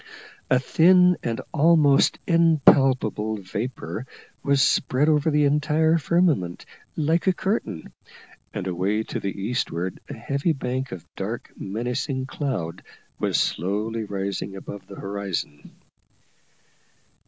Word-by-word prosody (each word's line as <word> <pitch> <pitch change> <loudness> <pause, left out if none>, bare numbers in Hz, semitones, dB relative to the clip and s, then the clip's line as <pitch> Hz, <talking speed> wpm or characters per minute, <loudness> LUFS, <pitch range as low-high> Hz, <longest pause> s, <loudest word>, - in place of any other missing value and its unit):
A 130 - +5
thin 180 +7 +5
and 115 -1 -2
almost 155 -2 +4
impalpable 135 -9 +3
vapour 110 +5 -5 0.3
was 140 -1 +2
spread 135 +2 +2
over 150 0 +3
the 150 -1 +3
entire 155 +3 +2
firmament, 155 - +1 0.3
like 160 +4 +1
a 190 - +5
curtain, 190 - -3 0.6
and - - -5
away 95 +4 0
to - - -5
the 100 0 -4
eastward 95 -5 -2
a - - -6
heavy 140 +4 -1
bank 130 -1 -3
of 90 - -8
dark - - -5
menacing 125 +6 -3
cloud 130 - -4 0.4
was - - +1
slowly 105 +5 -1
rising 100 -1 -4
above 95 0 -9
the 100 - -10
horizon. 95 -8 -5
130 Hz, 115 wpm, -24 LUFS, 100-150 Hz, 0.6 s, A